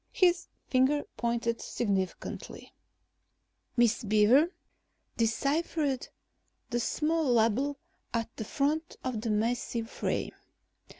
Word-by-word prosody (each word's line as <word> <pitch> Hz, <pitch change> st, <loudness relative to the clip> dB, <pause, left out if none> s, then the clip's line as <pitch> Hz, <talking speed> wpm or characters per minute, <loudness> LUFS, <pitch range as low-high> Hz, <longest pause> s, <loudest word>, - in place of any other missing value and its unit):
His 355 Hz, -1 st, +3 dB, 0.2 s
finger 270 Hz, +3 st, +3 dB
pointed 235 Hz, -1 st, -1 dB
significantly. 195 Hz, -5 st, -3 dB, 1.0 s
Miss 235 Hz, -1 st, +3 dB
Beaver 220 Hz, -, +5 dB, 0.6 s
deciphered 275 Hz, +4 st, 0 dB, 0.6 s
the 240 Hz, -, +1 dB
small 305 Hz, +3 st, +1 dB
label 240 Hz, +5 st, +2 dB, 0.3 s
at 230 Hz, 0 st, -2 dB
the 220 Hz, -, -4 dB
front 295 Hz, +8 st, -1 dB
of 250 Hz, -4 st, -2 dB
the 225 Hz, -, -2 dB
massive 230 Hz, +1 st, -1 dB
frame. -, -, -2 dB
240 Hz, 95 wpm, -30 LUFS, 225-290 Hz, 1.0 s, Beaver